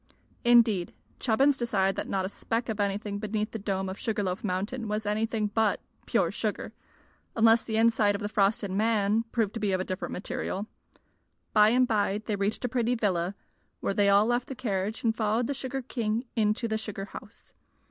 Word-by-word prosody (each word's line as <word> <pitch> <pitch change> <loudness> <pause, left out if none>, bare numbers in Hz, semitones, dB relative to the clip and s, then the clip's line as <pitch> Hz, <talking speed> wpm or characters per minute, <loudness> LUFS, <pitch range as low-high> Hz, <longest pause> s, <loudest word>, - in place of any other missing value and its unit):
Indeed, 230 -7 +4 0.2
Chubbins 265 +4 +3
decided 195 -6 +1
that - - -4
not 190 -1 0
a - - -3
speck 230 +3 -3
of 220 -1 -3
anything 200 0 -1
beneath 215 +1 -2
the 225 - -5
dome 195 -1 -2
of 190 +1 -6
Sugar 215 -2 -1
Loaf 185 +1 -3
Mountain 210 +5 -2
was 210 +1 -2
anything 215 +1 0
but 210 0 +1 0.3
pure - - +2
sugar - - -3 0.6
unless 225 0 +5
the 220 -1 -2
inside 225 -2 +3
of 200 - -5
the 205 - -1
frosted 200 -1 +1
man 215 +1 +2
proved 220 -4 0
to 230 - -4
be 205 -2 0
of 185 - +1
a - - 0
different 185 0 -4
material. 195 +1 -3 0.9
By 210 0 +6
and 250 +2 +3
by 210 -1 0
they 215 - -1
reached 200 +5 -1
a - - +2
pretty 245 0 0
villa, 190 -4 0 0.4
where - - -1
they 200 -1 +3
all 200 +1 +5
left 240 +1 0
the 270 - -6
carriage 210 -3 -2
and 225 -2 +2
followed 220 +2 +1
the 280 - -1
sugar 265 0 -4
king 230 -1 -2
into 215 +1 +1
the 220 -1 -1
sugar 205 -3 -5
house. 220 +2 -13
215 Hz, 195 wpm, -28 LUFS, 200-230 Hz, 0.9 s, By